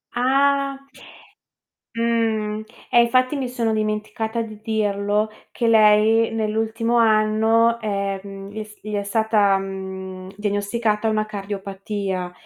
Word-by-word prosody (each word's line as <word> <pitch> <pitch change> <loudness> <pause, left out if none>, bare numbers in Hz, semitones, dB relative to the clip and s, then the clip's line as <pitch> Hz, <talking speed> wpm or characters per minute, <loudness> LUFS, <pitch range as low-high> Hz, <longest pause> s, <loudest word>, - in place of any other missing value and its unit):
Ah! 275 +2 +2 1.1
Mh, 225 -2 0 0.3
eh 240 - +6
infatti 255 +4 +2
mi 260 -3 -2
sono 230 -3 -1
dimenticata 215 +1 -2
di 215 -1 -8
dirlo, 210 -1 0 0.2
che 235 - -1
lei 220 +1 +5
nell'ultimo 225 +2 -1
anno, 225 +1 +3
ehm, 195 -1 -4
gli 215 - -11
è - - -4
s 210 0 -16
gli 215 0 -6
è 200 - -1
stata, 205 -1 +2
mhmm, 190 -1 -6
diagnosticata 210 +1 0
una 215 0 0
cardiopatia. 195 -2 -4
215 Hz, 115 wpm, -22 LUFS, 200-230 Hz, 1.1 s, eh